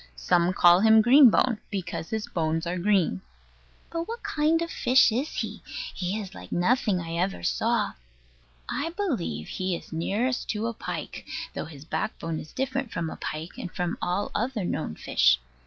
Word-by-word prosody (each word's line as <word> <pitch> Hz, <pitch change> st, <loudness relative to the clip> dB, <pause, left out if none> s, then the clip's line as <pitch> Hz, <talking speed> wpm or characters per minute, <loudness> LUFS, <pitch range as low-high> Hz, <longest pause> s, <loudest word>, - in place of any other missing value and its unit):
Some 170 Hz, -, +2 dB
call 175 Hz, -1 st, +6 dB
him 220 Hz, +2 st, +6 dB
Green 260 Hz, +2 st, +8 dB
bone, 230 Hz, 0 st, +2 dB
because 180 Hz, -5 st, -4 dB
his 220 Hz, -1 st, -2 dB
bones 160 Hz, 0 st, -1 dB
are 175 Hz, +1 st, -2 dB
green. 180 Hz, -, +2 dB, 0.7 s
But 335 Hz, +1 st, -3 dB
what 465 Hz, +1 st, -6 dB
kind 320 Hz, +2 st, +2 dB
of 335 Hz, -, -5 dB
fish 250 Hz, -1 st, +4 dB
is 255 Hz, +7 st, -1 dB
he? -, -, -4 dB, 0.3 s
He 190 Hz, +3 st, -2 dB
is 195 Hz, -2 st, -7 dB
like -, -, -11 dB
nothing 205 Hz, +1 st, +2 dB
I 165 Hz, -1 st, -4 dB
ever 180 Hz, -, -1 dB
saw. -, -, +1 dB, 0.7 s
I 325 Hz, -, -2 dB
believe 330 Hz, -, -2 dB
he 185 Hz, -1 st, -2 dB
is 170 Hz, -, -9 dB
nearest 220 Hz, +10 st, -1 dB
to 215 Hz, +1 st, -1 dB
a 235 Hz, -, -1 dB
pike, -, -, -6 dB, 0.3 s
though -, -, -4 dB
his 150 Hz, -2 st, -11 dB
backbone 165 Hz, -3 st, -3 dB
is 155 Hz, -, -10 dB
different 265 Hz, -2 st, -2 dB
from 165 Hz, -6 st, -3 dB
a -, -, -6 dB
pike, 155 Hz, +3 st, -6 dB
and 180 Hz, -, -5 dB
from 180 Hz, -2 st, -2 dB
all 180 Hz, +3 st, -1 dB
other 230 Hz, -3 st, -1 dB
known 155 Hz, -, -2 dB
fishes. -, -, +3 dB
195 Hz, 175 wpm, -27 LUFS, 170-245 Hz, 0.7 s, Green